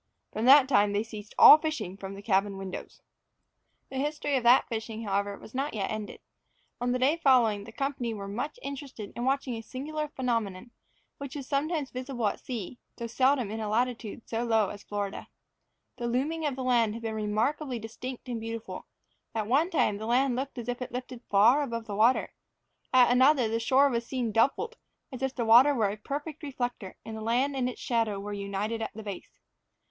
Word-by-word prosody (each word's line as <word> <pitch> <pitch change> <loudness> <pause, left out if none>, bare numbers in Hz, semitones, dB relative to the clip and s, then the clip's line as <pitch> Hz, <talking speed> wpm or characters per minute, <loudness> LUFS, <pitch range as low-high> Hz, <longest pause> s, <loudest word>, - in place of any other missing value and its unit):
From 220 - -2
that 270 +1 +8
time 205 -6 +3
they 205 +1 +1
ceased 215 -2 -10
all 305 - +10
fishing 310 - -3
from 195 0 -7
the 200 - -10
cabin 195 -1 +1
windows. 190 -1 -8 0.9
The 265 - -5
history 290 0 -1
of 260 - +2
that 240 +2 +5
fishing, 225 -1 -5
however, 200 0 -1
was - - -14
not 275 0 -2
yet 195 -2 -2
ended. 215 -1 -6 0.6
On 245 0 +1
the 250 - +1
day 270 +6 +2
following 240 -9 +3
the 225 - -10
company 265 -2 -2
were 200 -3 -6
much 245 - -4
interested 275 -7 -7
in 240 - -3
watching 270 -1 0
a 225 - -5
singular 300 +6 -4
phenomenon, 235 -6 -3 0.5
which 280 -1 -7
is 275 -3 -6
sometimes 290 0 -1
visible 255 -2 -4
at 205 - 0
sea, 245 -1 -6 0.2
though 235 - -4
seldom 255 -1 +2
in 220 - -4
a 215 -1 -3
latitude 235 0 -2
so 230 +1 -2
low 225 -4 +2
as 205 - -8
Florida. 205 -1 -4 0.7
The 240 -1 -3
looming 300 +6 -1
of 280 - -2
the 260 - -4
land 235 -4 +2
had 230 - -8
been 225 -1 -2
remarkably 225 +6 -1
distinct 240 +4 -7
and 235 -2 -4
beautiful; 225 0 -6 0.5
at 220 -2 -1
one 280 - +2
time 210 - +1
the 220 - -5
land 250 +2 +2
looked 265 +1 -4
as 240 -1 -6
if 245 +1 -3
lifted 250 0 -6
far 225 +8 +5
above 230 -5 -3
the 205 - -5
water; 230 +5 +3 0.6
at 250 -1 +6
another 260 0 +5
the 225 +1 -1
shore 265 +4 +4
was 235 -3 -1
seen 250 -4 -2
doubled, 275 - +1 0.3
as 255 -1 -8
if 265 0 -1
the 235 - -1
water 250 +6 +7
were 215 -5 +1
a - - -4
perfect 290 +7 -6
reflector, 245 - -4
and 220 - -6
the 220 - -6
land 250 +5 +1
and 250 -2 0
its 250 - -8
shadow 225 -4 0
were 205 +1 -5
united 200 +3 -3
at 220 - -3
the 220 - -7
base. 200 -3 -8
240 Hz, 200 wpm, -28 LUFS, 215-265 Hz, 0.9 s, all